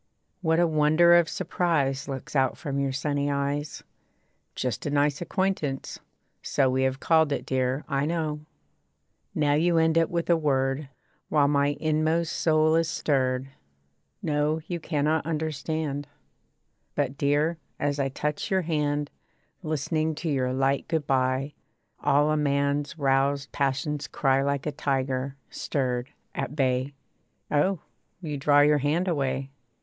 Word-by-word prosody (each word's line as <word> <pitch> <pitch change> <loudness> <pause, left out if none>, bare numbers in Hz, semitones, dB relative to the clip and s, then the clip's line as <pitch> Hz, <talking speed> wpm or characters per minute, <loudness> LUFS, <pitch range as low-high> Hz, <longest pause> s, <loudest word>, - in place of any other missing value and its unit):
What 160 -1 +2
a 175 - +5
wonder 155 +2 +4
of 175 -2 +5
surprise 160 -7 0
Looks 135 +1 -6
out 130 -1 +2
from 140 -4 -3
your 140 -1 0
sunny 145 +1 -1
eyes. 145 +1 -2 0.7
'Just 125 -2 -2
a - - 0
nice 145 +1 +1
acquaintance.' 175 -7 -2 0.4
So 135 -2 +1
We 130 +1 +1
have 130 0 0
called 160 -1 +3
it, - - -2
dear, 130 +2 -1
I 140 0 0
know. 155 -2 -1 1.0
Now 145 -1 +2
you 165 +3 +3
end 160 0 +3
it 165 -1 +3
with 170 -1 -2
a - - +6
word, 135 -2 0 0.4
While 145 -2 +4
my 145 0 +2
inmost 155 +1 +1
soul 155 0 +3
is 165 -1 +2
stirred. 130 -4 0 0.7
No 150 +1 +1
you 175 0 -4
cannot 155 0 0
understand. 155 -2 -3 0.9
But, 135 - -1
dear, 150 +4 +1 0.2
as 145 0 -1
I 135 -1 +1
touch 150 +2 -3
your 190 -1 +1
hand, 150 -2 -1 0.5
Listening 155 0 -1
to 165 +2 -3
your 130 -2 0
light 135 +1 0
good 160 -3 -1
bye, 130 +1 0 0.5
All 145 +2 +3
a 155 - +2
man's 140 +1 0
roused 140 0 +1
passions 140 +1 -1
cry 135 -1 +1
Like 140 0 -1
a 150 - -1
tiger, 135 -1 -1 0.2
stirred, 125 -2 -2 0.2
at 135 +1 -4
bay. 130 0 0 0.6
Oh! 160 +4 +2 0.4
you 155 -5 -4
draw 145 +1 +5
your 150 0 +4
hand 155 +6 0
away. 135 -4 -1
145 Hz, 145 wpm, -26 LUFS, 135-155 Hz, 1.0 s, a